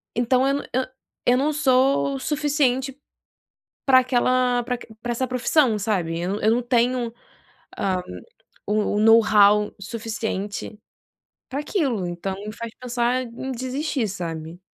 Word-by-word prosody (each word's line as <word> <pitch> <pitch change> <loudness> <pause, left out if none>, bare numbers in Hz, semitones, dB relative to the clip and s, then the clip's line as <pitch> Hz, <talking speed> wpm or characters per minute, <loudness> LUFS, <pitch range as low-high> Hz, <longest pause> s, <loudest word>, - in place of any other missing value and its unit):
Então 250 +2 +2
eu 275 - +2
n - - -10
eu 260 +1 +1 0.4
eu 245 +1 +4
não 300 +3 +1
sou 270 -1 +2
suficiente, 280 -2 0 0.9
para 265 -2 +6
aquela, 250 -1 +2
para 250 +1 -2
aq 245 - -13 0.2
para 240 - -3
essa 260 +2 -1
profissão, 255 -2 +2
sabe, 180 -5 -1
eu 180 +2 -2
não 210 - -4
eu 220 - +4
não 245 +1 +1
tenho, 240 -1 +1 0.7
ah, 185 -2 0 0.7
o 210 0 0
o - - +2
know-how 210 -2 +5
suficiente 215 -1 -4 0.7
para 275 +2 -3
aquilo, 270 - -1
então 175 +2 -4
me 210 +2 -7
faz 230 0 -7
pensar 245 0 0
em 250 +2 -6
desistir, 260 0 -2
sabe. 170 -3 -6
240 Hz, 140 wpm, -23 LUFS, 210-260 Hz, 0.9 s, para